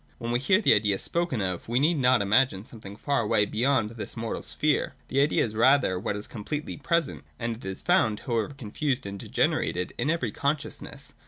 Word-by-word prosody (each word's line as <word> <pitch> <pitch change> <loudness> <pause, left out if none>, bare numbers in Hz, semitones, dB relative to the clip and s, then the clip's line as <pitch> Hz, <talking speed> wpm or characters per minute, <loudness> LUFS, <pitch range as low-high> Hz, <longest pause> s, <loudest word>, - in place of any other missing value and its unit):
When 120 -1 -4
we 120 - +2
hear 185 +9 +3
the - - +6
Idea 105 -2 +2
spoken 170 - -1
of, 90 -2 -3
we 120 +2 +2
need 155 +2 +2
not 125 -4 +4
imagine 105 -1 +2
something 105 -4 -10
far 140 +4 0
away 105 -1 +2
beyond 120 0 +1
this 115 +1 -7
mortal 115 0 -3
sphere. 150 -3 0
The 135 - +2
idea 145 - +3
is 110 - -6
rather 115 -4 +3
what 100 - -2
is 105 - -5
completely 145 +8 -5
present: 170 +3 0
and 115 -1 -3
it 110 - -13
is 95 0 -4
found, 110 -2 +2
however 120 +1 -2
confused 130 +2 -2
and 100 0 -6
degenerated, 90 -1 0
in 145 - 0
every 140 -9 0
consciousness. 145 +6 -4
120 Hz, 195 wpm, -27 LUFS, 105-140 Hz, -, the